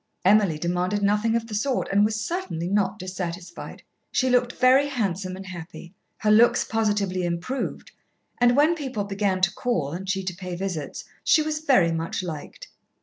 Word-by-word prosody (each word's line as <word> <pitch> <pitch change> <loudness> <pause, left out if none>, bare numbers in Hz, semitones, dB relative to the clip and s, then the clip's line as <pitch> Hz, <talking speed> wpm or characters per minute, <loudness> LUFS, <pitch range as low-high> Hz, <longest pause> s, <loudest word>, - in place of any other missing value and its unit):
Emily 195 -5 +4
demanded 180 +5 -1
nothing 210 +3 +2
of 230 -1 0
the 225 - -9
sort, 250 +5 0
and 200 +1 +4
was 215 +1 +1
certainly 220 - -3
not 195 +1 +1
dissatisfied. 180 -2 -6 0.3
She 260 -1 +1
looked 245 0 +2
very 260 +3 +4
handsome 195 -8 -2
and 190 +1 -9
happy. 175 -1 -9 0.2
Her 210 - +1
looks 230 +3 +5
positively 205 -4 0
improved, 175 +10 -3 0.5
and 245 +1 +4
when 305 +4 +5
people 265 -10 -3
began 200 -2 -1
to 185 -1 +3
call 175 - -1
and 185 +4 -6
she 195 -1 -1
to 185 -2 -4
pay 180 -1 -6
visits, 175 -5 -4 0.2
she 310 - +4
was 305 0 -2
very 255 - +3
much 165 +2 -3
liked. 160 -5 -7
200 Hz, 170 wpm, -25 LUFS, 180-235 Hz, 0.5 s, looks